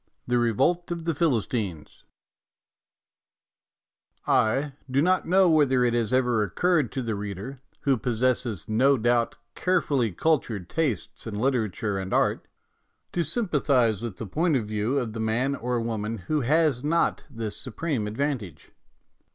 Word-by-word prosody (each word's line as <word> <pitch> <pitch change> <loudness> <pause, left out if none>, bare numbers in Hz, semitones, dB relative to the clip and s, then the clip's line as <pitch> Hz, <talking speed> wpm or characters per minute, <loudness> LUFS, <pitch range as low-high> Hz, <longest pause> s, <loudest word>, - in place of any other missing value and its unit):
XIX - - -45
THE 125 - +3
REVOLT 140 - +1
OF 170 -1 -4
THE 165 - +1
PHILISTINES 115 - -2 2.2
I 135 +6 +2 0.2
DO 130 +2 +1
not 185 +5 +2
know 185 +2 +5
whether 145 -6 +4
it 120 -1 +2
has 115 -3 0
ever 125 -3 +2
occurred 150 - +1
to 130 - -2
the 115 -1 -2
reader, 105 +6 -6 0.2
who 135 -2 +2
possesses, 120 -3 -1
no 130 +6 +3
doubt, 120 0 +1 0.2
care 185 0 +2
fully 125 -10 0
cultured 110 - 0
tastes 140 - -2
in 110 - -5
literature 110 -4 0
and 95 0 -2
art, - - +1 0.6
to 175 - 0
sympathize 140 - +1
with 115 -5 -5
the 115 - -5
point 155 - +1
of 120 -5 0
view 110 +5 -1
of 120 -5 -2
the 115 - -5
man 115 +5 0
or 125 -2 -2
woman 115 -1 -3
who 150 +10 -1
has 145 -1 +2
not 165 +3 +1
this 115 -5 -5
supreme 130 -3 -3
advantage. 115 - -4
125 Hz, 150 wpm, -26 LUFS, 110-145 Hz, 2.2 s, know